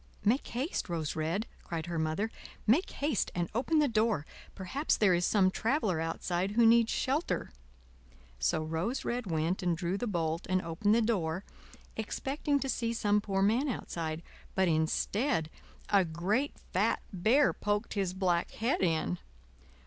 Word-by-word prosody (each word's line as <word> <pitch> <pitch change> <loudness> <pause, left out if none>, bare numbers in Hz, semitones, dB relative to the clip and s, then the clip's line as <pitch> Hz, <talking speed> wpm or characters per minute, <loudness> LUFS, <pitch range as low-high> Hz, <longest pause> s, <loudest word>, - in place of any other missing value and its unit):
"Make 240 +7 +2
haste, 255 - -2
Rose 160 -3 -2
Red," 165 +7 -1 0.2
cried 165 -2 -4
her 170 -2 -3
Mother; 160 +8 -1 0.3
"make 265 - +3
haste 285 -6 -1
and 175 -1 -1
open 255 +8 +1
the 300 -1 +4
door; 215 - +1 0.3
perhaps 265 - -1
there 200 -4 +4
is 175 0 +2
some 190 -3 +4
traveler 220 - 0
outside 175 +4 -1
who 235 +1 +5
needs 230 0 +5
shelter." 280 +6 -1 0.9
So 65 - +1
Rose 165 +11 -2
Red 240 -2 -2
went 165 +3 0
and 175 -2 +1
drew 180 +3 -1
the 245 - -2
bolt 165 -4 -1
and 185 0 +3
opened 205 +6 +1
the 230 - +3
door, 185 -5 0 0.5
expecting 280 +6 -1
to 270 - -1
see 230 -2 -1
some 210 -2 +2
poor 195 -2 0
man 235 +8 +2
outside, 165 -8 -4 0.3
but 190 -1 +3
instead, 160 - +1 0.4
a 200 -2 +5
great 185 - -1 0.2
fat - - +1
Bear 230 +10 +4
poked 205 +2 -1
his 190 -3 -1
black 180 -2 +1
head 235 +5 0
in. 160 - +1
200 Hz, 155 wpm, -31 LUFS, 170-235 Hz, 0.9 s, who